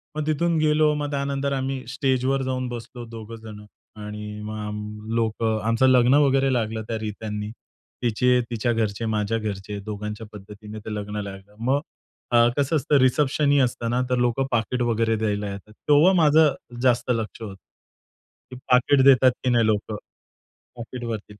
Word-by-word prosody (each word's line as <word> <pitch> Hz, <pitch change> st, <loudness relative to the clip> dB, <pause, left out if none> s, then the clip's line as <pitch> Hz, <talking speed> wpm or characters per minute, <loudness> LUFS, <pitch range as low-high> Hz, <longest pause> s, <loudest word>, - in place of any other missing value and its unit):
मग 155 Hz, -1 st, -2 dB
तिथून 165 Hz, +2 st, +1 dB
गेलो. 155 Hz, 0 st, +3 dB
मग 145 Hz, 0 st, -3 dB
त्यानंतर 140 Hz, 0 st, -1 dB
आम्ही 135 Hz, -1 st, -3 dB
स्टेजवर 135 Hz, 0 st, 0 dB
जाऊन 130 Hz, -1 st, -2 dB
बसलो 120 Hz, 0 st, -8 dB
दोघंजणं 110 Hz, -2 st, -10 dB, 0.4 s
आणि 105 Hz, 0 st, -7 dB
मग 110 Hz, +1 st, -6 dB
आम 105 Hz, 0 st, -5 dB, 0.3 s
लोकं, 110 Hz, -1 st, 0 dB
आमचं 115 Hz, +3 st, +3 dB
लग्न 125 Hz, 0 st, +5 dB
वगैरे 135 Hz, -1 st, +2 dB
लागलं 110 Hz, -2 st, -1 dB
त्या 115 Hz, -, -2 dB
रीत्यांनी. 105 Hz, 0 st, -5 dB, 0.5 s
तिचे, 125 Hz, +2 st, +2 dB
तिच्या 120 Hz, 0 st, -1 dB
घरचे, 110 Hz, 0 st, -1 dB
माझ्या 110 Hz, 0 st, 0 dB
घरचे, 105 Hz, -1 st, -5 dB
दोघांच्या 105 Hz, +1 st, -6 dB
पद्धतीने 105 Hz, +1 st, -10 dB
ते 110 Hz, -, -4 dB
लग्न 105 Hz, 0 st, -4 dB
लागलं. 100 Hz, +1 st, -10 dB
मग 135 Hz, +5 st, +1 dB, 0.5 s
अ, 120 Hz, -, +4 dB, 0.2 s
कसं 145 Hz, +3 st, +1 dB
असतं, 145 Hz, 0 st, +2 dB
रिसेप्शनही 140 Hz, +2 st, +3 dB
असतं 120 Hz, -2 st, 0 dB
ना. 125 Hz, +2 st, +1 dB
तर 125 Hz, -, +1 dB
लोकं 125 Hz, +3 st, 0 dB
पाकीट 120 Hz, +2 st, 0 dB
वगैरे 115 Hz, 0 st, +1 dB
द्यायला 105 Hz, -1 st, -1 dB
येतात. 100 Hz, +2 st, -10 dB, 0.2 s
तेव्हा 150 Hz, +6 st, +6 dB
माझं 155 Hz, -1 st, +5 dB, 0.3 s
जास्त 125 Hz, -1 st, +2 dB
लक्ष 115 Hz, -1 st, -3 dB
होतं, 105 Hz, -3 st, -6 dB, 1.0 s
की -, -, -7 dB, 0.2 s
पाकीट 130 Hz, +2 st, +5 dB
देतात 130 Hz, -2 st, +7 dB
की 130 Hz, -, +1 dB
नाही 115 Hz, -2 st, +3 dB
लोकं. 110 Hz, 0 st, -1 dB, 0.8 s
पॉकेटवरती 115 Hz, -3 st, -6 dB
115 Hz, 155 wpm, -24 LUFS, 105-135 Hz, 1.0 s, देतात